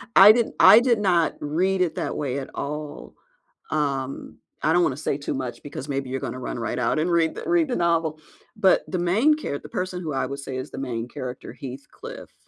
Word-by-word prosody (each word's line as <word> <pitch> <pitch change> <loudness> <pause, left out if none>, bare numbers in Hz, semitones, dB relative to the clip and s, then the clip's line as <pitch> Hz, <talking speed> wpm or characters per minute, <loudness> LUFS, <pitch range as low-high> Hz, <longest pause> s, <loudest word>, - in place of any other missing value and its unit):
I 200 +2 +11
didn't 235 0 0
I 210 +5 +9
did 240 -3 +2
not 175 -6 +2
read 185 +6 0
it 175 - +1
that - - -3
way 140 -1 -2
at 135 - -7
all, 150 +1 -6 0.6
um, 140 -2 -2 0.2
I 160 - +3
don't 175 - +4
wanna 130 - 0
say 145 -2 -1
too 145 - -4
much 125 -3 -5
because 145 0 -7
maybe 135 -2 -2
you're 135 - -2
going - - -3
to 130 - -7
run 125 - -5
right 115 - -2
out 115 - +1
and 165 +3 0
read 165 -2 +2
the - - -6
read 345 -3 +3
the 245 - 0
novel, 165 -2 +1 0.4
but, 195 -3 +4
the 185 - -2
main 215 - +3
char 140 - -4
the - - -12
person 180 0 -3
who 155 -3 -4
I 135 - 0
would 140 +2 -5
say 140 -1 -6
is 130 +3 -6
the - - -8
main 120 -3 -3
character, 125 0 -7
Heathcliff 135 +1 -10
150 Hz, 225 wpm, -24 LUFS, 135-185 Hz, 0.6 s, I